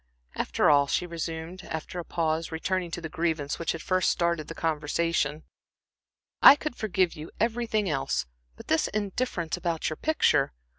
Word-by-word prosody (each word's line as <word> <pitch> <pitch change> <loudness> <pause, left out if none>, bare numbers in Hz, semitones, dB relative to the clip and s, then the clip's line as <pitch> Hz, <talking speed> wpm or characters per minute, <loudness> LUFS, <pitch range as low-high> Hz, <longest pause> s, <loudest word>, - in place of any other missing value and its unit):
"After - - +1
all," 145 -1 +5
she 180 - 0
resumed, 165 +1 -5
after 160 +3 -5
a - - -4
pause, 165 -1 -1
returning 180 +2 -1
to 175 - -5
the 160 - -4
grievance 160 -3 -2
which 170 - -1
had 165 - -7
first 185 -1 +2
started 170 -3 0
the 165 - -7
conversation, 155 -1 0 1.0
"I - - +11
could 300 -3 -5
forgive 190 -6 +1
you 155 0 -8
everything 225 -2 0
else, 135 -5 -1 0.3
but - - -12
this 160 - +2
indifference 205 -4 -2
about 165 -3 -1
your 155 - -4
picture. 305 - +2
170 Hz, 160 wpm, -27 LUFS, 160-185 Hz, 1.0 s, I